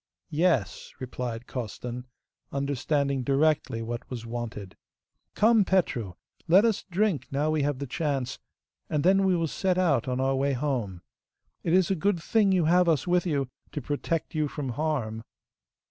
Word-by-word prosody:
'Yes,' 150 - 0
replied 125 -2 -5
Costan, 125 +1 -6 0.4
understanding 140 0 0
directly 135 -3 +1
what 120 +1 -5
was 120 -3 -6
wanted. 115 -5 -6 0.6
'Come, 220 0 +5
Petru, 125 - 0 0.3
let 190 +6 +6
us 225 -3 +1
drink 180 - 0
now 145 +3 0
we 155 -1 +1
have 145 -1 0
the 140 - -4
chance, 140 -2 -2 0.5
and 150 -2 0
then 195 +2 +5
we 185 -1 +3
will 165 -1 +1
set 185 +3 0
out 170 -7 +2
on 125 0 -1
our 135 +1 +2
way 140 +1 +1
home. 120 - -2 0.6
It 165 - 0
is 185 0 +4
a - - +3
good 190 +1 +1
thing 205 +4 +2
you 180 -4 +3
have 175 +2 +4
us 155 -5 +2
with 180 0 +2
you, 140 -5 0 0.3
to - - -2
protect 155 +3 -2
you 155 -2 +1
from 145 -2 -4
harm. 125 -5 -2
145 Hz, 160 wpm, -27 LUFS, 125-175 Hz, 0.6 s, let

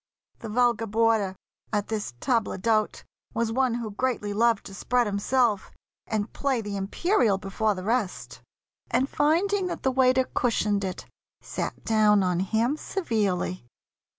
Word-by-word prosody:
The 225 - -7
vulgar 235 0 +2
boarder 220 -3 +2 0.4
at 205 -2 -1
this 210 - -3
table 230 -6 0
d'hôte 215 +2 0 0.3
Was 230 -1 0
one 255 0 +1
who 230 -3 -4
greatly 210 -2 -1
loved 230 0 +2
to 195 - -9
spread 245 +4 +1
himself 210 +1 +1 0.4
And 215 -1 -2
play 275 -3 0
the 205 -2 -4
imperial 210 - +1
before 195 +2 -1
the 185 - -6
rest; 220 -2 -2 0.5
And 265 - +2
finding 360 +8 +1
that - - -5
the 265 - +2
waiter 260 0 +4
cushioned 210 -4 +1
it, 185 -1 -4 0.4
Sat - - -5
down 210 -2 +4
on 180 -1 +1
him 225 +9 +1
severely. 205 - -2
225 Hz, 145 wpm, -26 LUFS, 205-250 Hz, 0.5 s, waiter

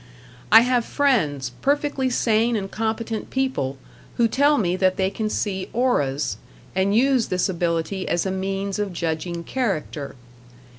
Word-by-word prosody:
I 225 +2 +10
have 245 0 +2
friends, 160 - +1
perfectly 280 -1 +1
sane 230 -1 +2
and 195 -2 -3
competent 225 0 -3
people, 260 - -1 0.4
who 235 - +4
tell 285 +5 +3
me 180 -6 +1
that 185 0 +2
they 190 -1 +1
can 215 +1 -2
see 190 -3 -2
auras, 145 - 0 0.4
and 190 +2 +1
use 255 0 +3
this 185 +2 0
ability 175 +1 -1
as 175 - 0
a 190 - -1
means 195 +1 -2
of 205 -3 -2
judging 170 +1 -3
character. 165 - -3
200 Hz, 145 wpm, -23 LUFS, 175-240 Hz, 0.4 s, I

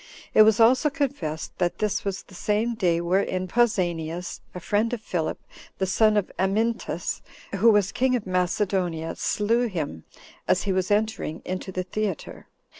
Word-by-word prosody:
It - - +7
was 215 0 +6
also 255 +6 +5
confessed 270 - -3
that 175 -1 0
this 210 -2 -1
was 195 -2 -3
the - - -18
same 210 +5 0
day 175 -7 +1
wherein 185 +1 0
Pausanias, 175 -7 0 0.2
a - - -4
friend 205 +6 0
of 240 - -2
Philip, 170 -7 -2 0.4
the 190 - 0
son 210 +4 +3
of 205 - 0
Amyntas, 220 +5 -1 0.4
who 225 +4 +6
was 205 -2 +3
king 255 0 +2
of 240 - -2
Macedonia, 180 -2 0
slew 230 +4 +1
him, 155 - -4 0.4
as 180 - +2
he 195 - 0
was 185 -1 0
entering 210 -6 -1
into 185 +1 -4
the 185 0 -2
theater. 195 0 -4
195 Hz, 160 wpm, -25 LUFS, 180-220 Hz, 0.4 s, It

